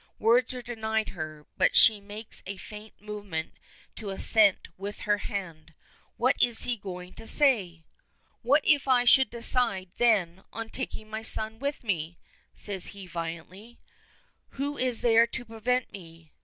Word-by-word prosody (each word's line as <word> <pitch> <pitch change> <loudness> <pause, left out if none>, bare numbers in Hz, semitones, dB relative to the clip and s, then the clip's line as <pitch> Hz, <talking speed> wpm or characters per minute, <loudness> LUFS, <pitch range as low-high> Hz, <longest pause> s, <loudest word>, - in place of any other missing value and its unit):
Words 235 +3 +2
are 250 - -7
denied 220 -2 -2
her, 155 -3 -7
but - - +2
she 215 -2 +6
makes 210 +2 -11
a 195 0 -5
faint 210 +2 -12
movement 205 -6 -6 0.4
to 215 -3 -6
assent 200 +1 +4
with 200 +2 -7
her 205 0 +1
hand. 165 -7 -6 0.4
What 255 +3 +2
is 240 -2 +3
he 245 - 0
going 180 -3 -9
to 225 - -12
say! 200 - +3 0.6
"What 280 +5 +3
if 290 -2 +3
I 250 -2 +4
should 265 -1 +6
decide, 230 -6 +2
then, 190 -6 +2
on 225 0 -6
taking 220 -4 -5
my 220 +1 -5
son 220 0 0
with 280 +1 -4
me?" 170 -6 -3 0.4
says 195 -3 -5
he 195 - -8
violently. 175 +6 -7 0.8
"Who 285 +2 -2
is 250 -4 -2
there 230 -1 +5
to 235 +1 -7
prevent 235 +3 -2
me? 165 -4 -13
215 Hz, 155 wpm, -27 LUFS, 185-240 Hz, 0.8 s, she